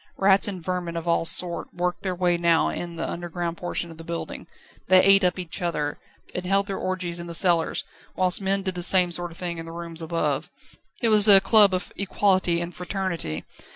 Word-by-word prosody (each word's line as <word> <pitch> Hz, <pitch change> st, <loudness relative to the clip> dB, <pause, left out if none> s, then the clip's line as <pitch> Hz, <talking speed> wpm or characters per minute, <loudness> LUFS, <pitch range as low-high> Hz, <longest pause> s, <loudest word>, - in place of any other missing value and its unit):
Rats 195 Hz, +1 st, +3 dB
and 185 Hz, -5 st, -6 dB
vermin 180 Hz, -2 st, -4 dB
of 165 Hz, +1 st, -6 dB
all 170 Hz, 0 st, +1 dB
sorts 170 Hz, 0 st, +3 dB
worked 180 Hz, 0 st, -2 dB
their 185 Hz, -2 st, -3 dB
way 175 Hz, -1 st, +1 dB
now 170 Hz, -1 st, +2 dB
in 170 Hz, -1 st, -6 dB
the -, -, -4 dB
underground 175 Hz, 0 st, -5 dB
portion 175 Hz, -1 st, -3 dB
of 165 Hz, -, -14 dB
the -, -, -9 dB
building. 170 Hz, 0 st, -7 dB, 0.4 s
They 185 Hz, 0 st, +6 dB
ate 195 Hz, 0 st, +5 dB
up 180 Hz, 0 st, +1 dB
each 180 Hz, +1 st, -6 dB
other, 150 Hz, -4 st, -3 dB, 0.3 s
and 180 Hz, -, -4 dB
held 195 Hz, +2 st, +1 dB
their 195 Hz, -1 st, -5 dB
orgies 180 Hz, -2 st, -3 dB
in 170 Hz, -, -8 dB
the 170 Hz, -, -2 dB
cellars, 170 Hz, -2 st, +1 dB, 0.3 s
whilst 185 Hz, +1 st, +1 dB
men 195 Hz, 0 st, -1 dB
did 190 Hz, -1 st, -2 dB
the 180 Hz, -, -6 dB
same 180 Hz, 0 st, +4 dB
sort 175 Hz, +1 st, -2 dB
of 165 Hz, -, -14 dB
thing 175 Hz, -2 st, -5 dB
in 165 Hz, -, -8 dB
the -, -, -8 dB
rooms 170 Hz, -1 st, -5 dB
above. 155 Hz, -3 st, -2 dB, 0.5 s
It 230 Hz, -, +4 dB
was 215 Hz, -1 st, +7 dB
a 200 Hz, -2 st, +9 dB
club 210 Hz, -1 st, +5 dB
of 185 Hz, -1 st, -4 dB
Equality 185 Hz, -3 st, +1 dB
and 175 Hz, +1 st, -6 dB
Fraternity. 180 Hz, -, -5 dB
175 Hz, 215 wpm, -24 LUFS, 170-190 Hz, 0.5 s, a